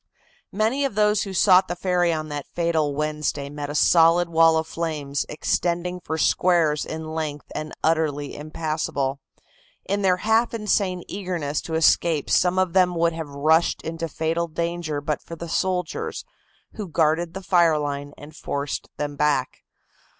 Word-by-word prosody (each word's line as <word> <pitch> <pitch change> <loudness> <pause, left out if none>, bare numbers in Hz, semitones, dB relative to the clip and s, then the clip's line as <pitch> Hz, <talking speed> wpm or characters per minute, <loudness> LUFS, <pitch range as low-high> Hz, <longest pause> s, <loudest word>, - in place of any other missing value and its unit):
Many 225 +7 0
of 270 -7 -1
those 210 0 +3
who 195 - -6
sought 185 0 +5
the 175 - -3
ferry 180 -1 +1
on 155 -1 -3
that 145 -1 -5
fatal 160 -4 0
Wednesday 150 -1 -2
met 145 -1 -5
a 145 - -5
solid 170 +2 +5
wall 165 -1 +5
of 160 - 0
flames 155 -4 -3
extending 175 +3 -1
for 160 -2 -4
squares 160 -2 +2
in 160 0 -6
length 150 -2 -4
and 155 0 -5
utterly 155 -3 0
impassable. 150 -3 -3 0.7
In 200 +1 -1
their 185 -2 +3
half 225 +4 +1
insane 200 -4 0
eagerness 175 -7 -3
to 160 - -5
escape 160 -1 +2
some 180 0 +3
of 185 -2 +1
them 180 -2 +3
would 170 0 +2
have 160 -2 -6
rushed 155 +4 +2
into 165 +1 -4
fatal 165 +2 -1
danger 170 -2 -3
but 150 0 -2
for 165 - -9
the 170 +1 -7
soldiers, 185 - -2 0.5
who 210 -4 -6
guarded 165 +1 +1
the 195 - -6
fire 170 -4 +4
line 145 -1 -4
and 150 +1 -12
forced 140 -1 -4
them 145 -1 -3
back. 145 -3 0
165 Hz, 160 wpm, -23 LUFS, 150-180 Hz, 0.7 s, sought